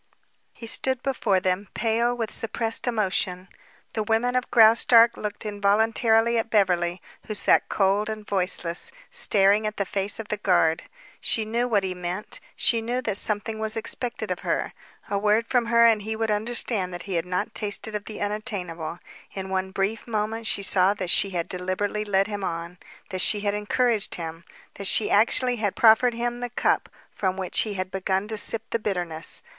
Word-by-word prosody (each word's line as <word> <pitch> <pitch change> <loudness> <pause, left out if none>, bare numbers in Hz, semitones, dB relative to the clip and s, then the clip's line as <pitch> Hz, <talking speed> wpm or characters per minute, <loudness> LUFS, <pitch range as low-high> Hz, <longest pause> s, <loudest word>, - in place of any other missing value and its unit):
He 230 - -11
stood 260 +2 -1
before 225 -8 +1
them, 185 +2 -1
pale 235 +2 0
with 225 -3 -4
suppressed 225 +1 -1
emotion. 190 -5 -1 0.4
The 220 - -1
women 225 +3 0
of 255 0 -1
Graustark 230 +1 +6
looked 210 +1 -5
involuntarily 220 +3 +2
at 225 - -3
Beverly, 180 -4 +1 0.2
who 215 - -3
sat - - +3
cold 200 +2 +1
and 215 -1 -6
voiceless, 180 - -2 0.2
staring 205 +1 +5
at 215 - -5
the 200 - -1
face 200 +3 0
of 220 - -7
the 210 - -1
guard. 170 -5 +1 0.3
She 220 - 0
knew 235 +3 -1
what 210 -5 +1
he 185 -1 -2
meant; 180 +3 -5 0.2
she 230 -1 +3
knew 240 +3 -2
that 210 -4 0
something 215 +1 -2
was 220 0 0
expected 225 -2 -4
of 180 - -2
her. - - -2 0.3
A 200 - -1
word 210 +2 +2
from 245 -2 +1
her 235 0 +5
and 225 -2 +4
he 220 +2 -4
would 220 0 -1
understand 210 -3 -1
that 175 - -8
he 195 - -6
had 170 0 -1
not 205 +5 -3
tasted 215 +1 -2
of 210 0 -4
the 215 - -8
unattainable. 185 -6 -4 0.4
In 190 -1 -6
one 190 0 -1
brief 195 +5 -2
moment 220 0 -2
she 200 - 0
saw 190 +1 +3
that 185 -4 -1
she 200 - +5
had 175 -2 -3
deliberately 185 +4 -2
led 195 -1 +2
him 205 -1 -5
on, 170 0 -5 0.3
that 185 -1 -1
she 205 +2 +3
had 205 -1 -1
encouraged 215 +1 0
him, 165 0 -7 0.4
that 200 - +2
she 215 - +3
actually 245 +4 +3
had 205 -3 -2
proffered 230 +2 +5
him 240 +1 -3
the 245 0 -4
cup 240 - 0 0.2
from 190 -1 -2
which 185 -2 -2
he 210 -2 -1
had 185 0 -4
begun 190 +1 -1
to 220 - -2
sip 220 +1 +2
the 230 - 0
bitterness. 175 -6 -2
210 Hz, 185 wpm, -24 LUFS, 190-225 Hz, 0.4 s, Graustark